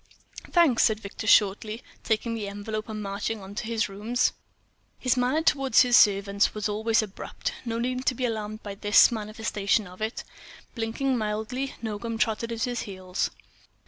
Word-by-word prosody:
"Thanks," 330 -9 +4
said 215 -1 +1
Victor, 210 +1 -7
shortly, 210 +2 +3 0.2
taking 230 +1 0
the 215 -3 -3
envelope 215 +2 -5
and 215 -1 -4
marching 205 +2 -3
on 195 0 -10
into 205 - -5
his 225 -1 0
rooms. 220 +5 0 0.6
His 255 -1 +1
manner 255 +6 +1
toward 275 -4 +1
his 245 -1 +7
servants 200 -1 +4
was 210 0 -1
always 220 +2 +1
abrupt. 215 - -5
No 230 -1 -2
need 255 +2 -2
to 255 - +3
be 255 - -1
alarmed 215 -2 -4
by 205 - -5
this 205 +3 +5
manifestation 215 -1 -1
of 180 +2 -13
it. 220 +2 -3 0.5
Blinking 240 +3 -1
mildly, 220 +5 -3
Nogam 225 +1 -3
trotted 225 +1 0
at 225 -1 -2
his 245 -2 -1
heels. 185 -3 -3
220 Hz, 165 wpm, -26 LUFS, 205-235 Hz, 0.6 s, his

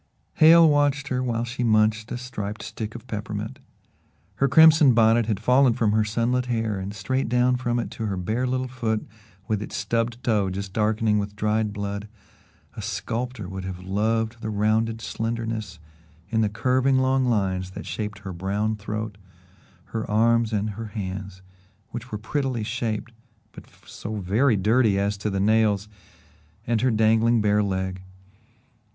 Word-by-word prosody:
Hale 165 +1 +8
watched 145 -1 +2
her 130 -1 0
while 120 -2 -1
she 125 +1 -3
munched 110 0 +2
a - - -2
striped 110 -4 -6
stick 110 0 -6
of 120 - -9
peppermint. 105 -4 -5 0.8
Her 135 - +3
crimson 155 -2 +7
bonnet 115 0 +4
had 105 -4 -1
fallen 125 +2 +4
from 115 -3 +1
her 110 +1 +3
sunlit 120 +4 0
hair 115 -4 -1
and 95 +1 -5
straight 110 +5 -2
down 125 +1 +3
from 120 -1 -1
it 120 - -3
to 110 - -4
her 100 -2 -2
bare 110 +8 -1
little 130 0 -1
foot 115 -4 -2 0.4
with 105 -2 -1
its - - -6
stubbed 115 +1 -1
toe 105 -5 +1
just 95 +1 -5
darkening 110 0 +1
with 100 0 -4
dried 105 0 0
blood, 100 0 -4 0.7
a - - -6
sculptor 120 -3 -4
would 95 0 -6
have 95 -1 -5
loved 110 +4 -1
the 110 - -3
rounded 110 +2 0
slenderness 115 -5 -4 0.5
in 110 -1 +2
the 105 - +2
curving 130 +5 +2
long 130 0 +2
lines 95 -5 0
that 95 - -8
shaped 105 -1 -4
her 95 -2 -5
brown 100 +5 -1
throat, 105 0 -5 0.7
her 110 -2 -3
arms 115 +1 +3
and 105 0 -1
her 110 +2 -6
hands, 95 -2 -6 0.5
which 120 +2 -7
were 105 - -2
prettily 130 +1 -2
shaped 115 0 -3 0.4
but - - -12 0.2
so 110 +1 -7
very 105 +6 +2
dirty 110 +1 +3
as 100 +1 0
to 100 +2 -3
the 100 -1 -2
nails, 105 0 +2 0.8
and 115 -1 0
her 130 - +3
dangling 115 +1 +3
bare 105 0 +3
leg. 95 -2 -2
110 Hz, 165 wpm, -24 LUFS, 105-120 Hz, 0.8 s, Hale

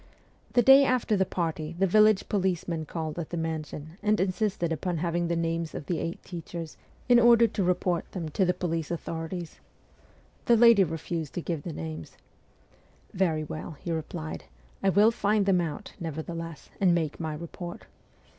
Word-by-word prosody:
The 245 - +5
day 270 +2 +8
after 250 -5 +2
the 190 -2 +1
party 165 -2 -3
the 195 - +3
village 215 +1 +4
policeman 175 -5 -1
called 160 -1 -4
at 165 - -5
the 175 - -4
mansion 160 0 -5
and 210 +1 +2
insisted 185 -2 0
upon 175 +2 -2
having 170 +1 -1
the 170 - 0
names 165 -1 -2
of - - -5
the 175 - -1
eight 165 +1 -4
teachers, 170 -2 -7 0.3
in 245 -1 +7
order 235 0 +7
to 210 -2 -1
report 180 -1 0
them 175 -4 -4
to 190 - +1
the 180 - +3
police 165 -3 -2
authorities. 165 0 -5 0.9
The 235 - +5
lady 230 -3 +7
refused 165 -2 -4
to 175 - -2
give 165 -4 -3
the 170 - -6
names. 80 - -7 0.5
' - - -32
Very 165 -5 +1
well,' 155 +1 -7
he 170 - -5
replied, 160 0 -5 0.2
' - - -31
I 195 - +4
will 205 +4 +5
find 210 -2 +1
them 190 -3 +3
out, 160 -4 -5
nevertheless, 165 0 -6
and 180 -3 +4
make 160 -3 -2
my 160 -2 -3
report. 170 +2 -8
170 Hz, 175 wpm, -28 LUFS, 160-195 Hz, 0.9 s, day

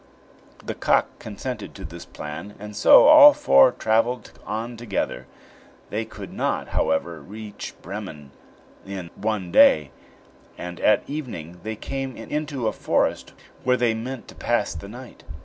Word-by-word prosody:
The - - -3
cock - - +1
consented 110 +1 -6
to 95 - -8
this 85 +1 -9
plan, 75 +7 -8
and 105 +1 -9
so 105 - +7
all 295 -1 +10
four 70 0 +5
traveled 115 +2 0 0.2
on 115 +3 -4
together. 100 - -3 0.6
They 110 +2 -2
could - - -10
not, - - -2
however, 80 0 -1
reach 105 +5 -9
Bremen 90 -8 -8 0.5
in 95 -3 -7
one 100 -5 -3
day, 75 -5 +5 0.7
and 90 0 -7
at 105 - +3
evening 90 - -6
they 110 +3 -5
came 135 +3 -5
into 140 0 -3
a - - 0
forest, - - -1 0.3
where 125 0 +3
they 120 -2 +2
meant 120 +3 -6
to - - -11
pass - - -1
the 85 +5 -8
night. 125 +3 -12
105 Hz, 145 wpm, -23 LUFS, 90-120 Hz, 0.7 s, all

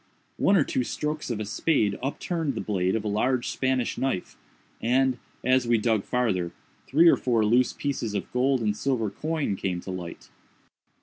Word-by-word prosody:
One 200 - +4
or 165 - +5
two 130 - -1
strokes 150 +4 -3
of 115 -3 -2
a 110 - -3
spade 105 -2 +1
upturned 145 +2 -2
the - - -3
blade 95 -2 0
of 110 - -1
a - - -3
large 120 +5 0
Spanish 130 -2 -1
knife, 130 -9 -2 0.5
and, 130 +1 +2 0.2
as 130 -1 +3
we 120 -1 +4
dug 110 -2 +1
farther, 100 -9 0 0.4
three 160 +5 +5
or - - +7
four 115 -4 +1
loose 120 +4 +3
pieces 120 -7 -3
of - - -4
gold 130 +1 +2
and 105 -2 0
silver 115 -3 -1
coin 155 -3 -2
came 90 -2 -2
to 95 - -6
light. 90 -2 -7
120 Hz, 180 wpm, -26 LUFS, 105-135 Hz, 0.5 s, or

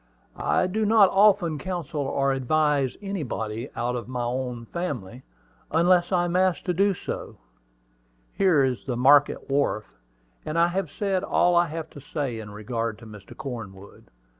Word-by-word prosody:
"I - - +2
do 210 +4 -1
not 210 -2 +5
often 195 -6 +4
counsel 165 -3 -4
or 135 0 0
advise 140 0 +1
anybody 125 - -4
out 120 +2 -1
of 120 -1 -5
my 125 -1 -3
own 125 -1 -3
family, 125 - -5 0.5
unless 175 +2 +3
I 175 -2 +2
am 175 0 -2
asked 185 -1 +2
to 180 - 0
do 195 +2 +2
so. - - -6 1.0
Here 180 -8 +3
is 130 -2 -1
the 125 -3 -2
market 140 +3 +4
wharf; 135 -6 0 0.6
and 155 - -4
I 170 +1 +4
have 185 -2 -2
said 195 +3 -1
all 175 0 +2
I 175 0 +4
have 160 0 -6
to - - -11
say 140 -5 -4
in 105 -1 -8
regard 110 +1 -4
to 115 - -14
Mr. 105 -3 -12
Cornwood. 105 -8 -8
145 Hz, 165 wpm, -25 LUFS, 120-175 Hz, 1.0 s, not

